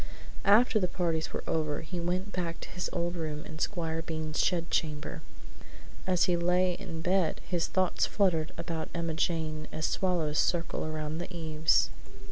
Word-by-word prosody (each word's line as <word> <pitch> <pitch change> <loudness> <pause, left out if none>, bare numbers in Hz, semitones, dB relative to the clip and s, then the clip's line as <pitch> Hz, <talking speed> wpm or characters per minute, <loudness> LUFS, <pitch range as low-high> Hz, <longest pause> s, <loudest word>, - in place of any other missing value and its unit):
After 215 +3 +6
the 180 - +1
parties 165 -3 -1
were - - -4
over 155 -2 0
he 175 +2 -5
went 180 +3 -1
back 170 -3 -2
to - - -7
his 180 +1 -3
old 175 0 -1
room 155 -3 -3
in 155 0 -8
Squire 165 -4 -1
Bean's 155 -1 -3
shed 170 -2 +1
chamber. 150 -2 -1 0.9
As 180 -2 +3
he 180 - +3
lay 180 +1 +3
in 165 -1 -6
bed 180 -2 +2
his 175 -3 0
thoughts 185 -2 +2
fluttered 170 -6 +2
about 165 -1 -3
Emma 165 -1 -1
Jane 155 -2 -1
as 155 - -2
swallows 165 -6 +1
circle 170 -1 +1
around 155 0 -3
the 175 - -5
eaves. 160 -2 +2
170 Hz, 165 wpm, -30 LUFS, 160-180 Hz, 0.9 s, After